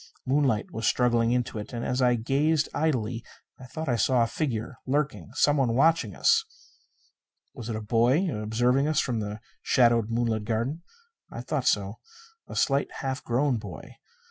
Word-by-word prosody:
Moonlight 130 -5 +1
was 115 - -2
struggling 120 -2 +2
into 125 -3 -1
it. 105 - -8
And, 120 0 -4
as 125 +1 -1
I 125 -1 +4
gazed 140 +6 +1
idly, 125 -7 -1 0.4
I 130 - -11
thought 160 +5 -6
I 120 - +1
saw 120 +2 +3
a - - +2
figure 120 -2 -3
lurking. 135 - -1
Someone 140 -6 +2
watching 165 +5 +2
us. 455 0 +3 1.1
Was 120 -3 -8
it 115 - -2
a 110 - -4
boy, 120 - +2
observing 120 +6 +1
us 155 -1 +1
from 120 -3 -1
the 105 0 -5 0.2
shadowed 115 -3 +3
moonlit 115 -2 0
garden? 115 +9 -2 0.5
I - - -7
thought - - -2
so. - - 0 0.5
A - - -9
slight, 140 0 +1
half 135 0 -3
grown 125 +2 +1
boy. 110 - -10
125 Hz, 165 wpm, -27 LUFS, 115-140 Hz, 1.1 s, I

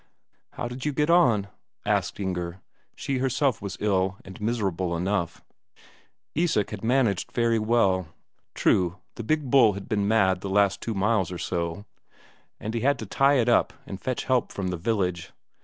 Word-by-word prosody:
"How - - -4
did 125 +2 -7
you 150 - -1
get 150 +4 +1
on?" 120 - +4 0.4
asked - - 0
Inger. 90 -2 -3 0.4
She 135 -2 -2
herself 135 0 +1
was 100 - -5
ill 95 -2 +1
and 95 +2 -11
miserable 95 -6 -1
enough. 90 -1 -2 0.9
Isak 155 - +1
had 105 -1 -7
managed 115 -5 +1
very 115 -1 +2
well. 105 -5 +2 0.5
True, 90 0 +2 0.2
the - - -7
big 145 +1 -1
bull 120 -6 +6
had 100 0 -8
been 100 -4 0
mad 95 -4 +3
the 100 - -4
last 100 0 +2
two 115 - -3
miles 100 -2 +1
or 90 - -4
so, 85 +3 -3 0.7
and 110 - -5
he 115 - -1
had 140 +3 +2
to 110 - -6
tie 135 +7 +3
it 120 -4 +2
up 120 - +3
and 95 0 -8
fetch 130 -1 -2
help 130 -2 +1
from 95 -2 -3
the 90 - -2
village. 90 -2 -2
105 Hz, 175 wpm, -26 LUFS, 95-120 Hz, 0.9 s, bull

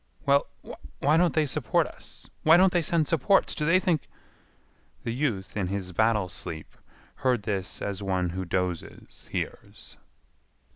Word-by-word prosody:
"Well, 140 0 +3 0.5
why 150 +3 +3
don't 175 +1 +3
they 155 -1 +3
support 140 -4 +1
us? - - -13
Why 160 +2 +7
don't 185 0 +5
they 175 - +3
send 165 -1 +1
supports? 165 +6 +3
Do 150 -2 -2
they 175 +3 +5
think—" 170 -6 0 1.0
The 115 - -2
youth 120 -8 -2
in 100 -4 -1
his 95 -1 -3
battle 110 0 +2
sleep 80 -2 -7 0.4
heard 125 -5 +1
this 100 -3 -3
as 100 -1 -3
one 95 -3 0
who 95 +1 -3
dozes 90 -1 -4
hears. - - -6
115 Hz, 150 wpm, -27 LUFS, 95-155 Hz, 1.0 s, Why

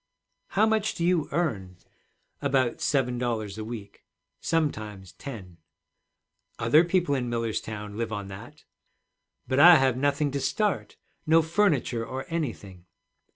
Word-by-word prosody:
'How 215 - +6
much 220 -1 +1
do 170 - -1
you 175 -3 +1
earn?' 105 - -2 0.6
'About 135 -4 +1
seven 125 -4 +1
dollars 110 -4 -2
a - - -4
week. 110 -3 -8 0.4
Sometimes 110 - -2
ten.' 95 -11 -9 1.0
'Other 125 +9 +5
people 175 -3 +1
in 125 -3 -1
Millerstown 110 -3 -3
live 115 -1 -2
on 105 -2 -4
that.' 95 0 -11 0.8
'But 130 +2 +1
I 175 +4 +10
have 135 -4 +3
nothing 145 +2 +1
to 140 - -2
start, 210 +9 -1 0.3
no 160 +1 +5
furniture 160 - +1
or 130 +3 -5
anything.' 105 - -5
130 Hz, 130 wpm, -27 LUFS, 110-160 Hz, 1.0 s, I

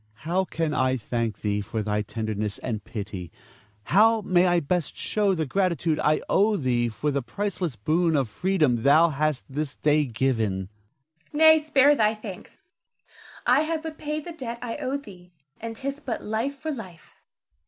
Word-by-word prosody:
Ernest. - - -30
How 185 +3 +1
can 160 -4 -2
I 130 -2 +1
thank 115 -1 -3
thee 105 -1 0
for 110 +1 -3
thy 105 0 0
tenderness 110 -1 -3
and 110 -5 -4
pity; 100 -6 -6 0.5
how 220 - +4
may 185 -2 +3
I 175 -1 +3
best 170 +1 -2
show 205 -3 +1
the 160 -2 -1
gratitude 170 -1 0
I 150 0 +3
owe 210 +1 +3
thee 120 -5 +1
for 145 +7 -2
the 140 0 0
priceless 180 - -3
boon 160 - +1
of 135 -4 +1
freedom 150 - +1
thou 155 +6 +5
hast 155 -1 -1
this 145 +1 -4
day 150 0 +2
given? 110 -7 -1 0.6
Zara. - - -6
Nay, 315 0 +7
spare 295 -2 +4
thy 215 -3 +2
thanks! 215 -4 -10 0.8
I 255 +4 +5
have 315 0 -2
but 320 -1 -7
paid 300 0 -3
the 345 - -6
debt 240 -6 -5
I 235 -1 -5
owed 280 +2 -3
thee, 180 -5 -14 0.3
and 230 0 -6
'tis 275 +4 -4
but 270 -6 -4
life 225 +6 -2
for 315 +3 -4
life. 190 - -10
170 Hz, 175 wpm, -25 LUFS, -, 0.8 s, Nay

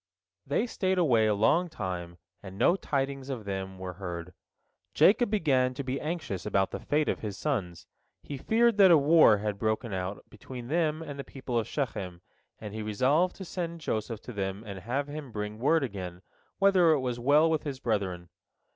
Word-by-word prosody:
They 145 - +1
stayed 190 -5 -1
away 120 -11 +4
a 105 - +2
long 165 - +3
time, 90 - -5 0.2
and 95 -1 -10
no 130 - +4
tidings 135 -5 -2
of 120 -6 -5
them 95 -1 -4
were 95 -1 -6
heard. 90 -1 -5 0.6
Jacob 230 +4 +5
began 135 -11 +2
to 140 - -4
be 130 +1 -3
anxious 150 - -4
about 100 -2 +1
the - - -4
fate 150 +1 0
of - - 0
his 105 -2 -5
sons. 100 - -3 0.4
He 145 - -6
feared 225 - +2
that 195 -2 +8
a 170 - +8
war 145 -6 +6
had 105 -1 -3
broken 110 0 -1
out 95 +1 -4
between 120 +3 -9
them 160 0 0
and 145 -3 -7
the - - -3
people 130 -4 -3
of 110 - -3
Shechem, 95 - -4 0.4
and 105 -2 -8
he 110 - -4
resolved 130 - +1
to 190 - -8
send 170 -1 -4
Joseph 110 -4 -3
to 125 - -9
them 95 0 -3
and 100 -2 -7
have 130 +9 -2
him 145 -3 -7
bring 105 0 -5
word 150 +5 +3
again, 95 -6 -6 0.3
whether 190 -4 +5
it 150 - +1
was 125 -2 -2
well 145 +6 +5
with 160 -2 +1
his 140 -3 -5
brethren. 95 -7 -2
125 Hz, 190 wpm, -29 LUFS, 100-155 Hz, 0.6 s, that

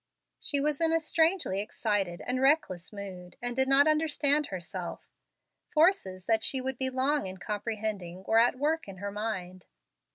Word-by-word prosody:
She 285 - -1
was 295 +2 0
in 325 -1 +3
a 330 - +3
strangely 320 - +1
excited 200 -6 -2
and 255 +1 -1
reckless 265 - +2
mood, 190 -4 -8
and 245 0 -3
did 265 0 +2
not 275 +1 +6
understand 300 -2 +2
herself. 180 -1 -6 0.6
Forces 305 - +2
that 225 -1 +2
she 265 - 0
would 260 -1 -4
be 260 0 +1
long 265 -1 +1
in 190 0 -7
comprehending 205 -3 -4
were 225 +3 +3
at 240 +2 +3
work 310 +2 0
in 195 -1 -9
her 200 +2 -4
mind. 185 -4 -5
225 Hz, 165 wpm, -29 LUFS, 190-285 Hz, 0.6 s, not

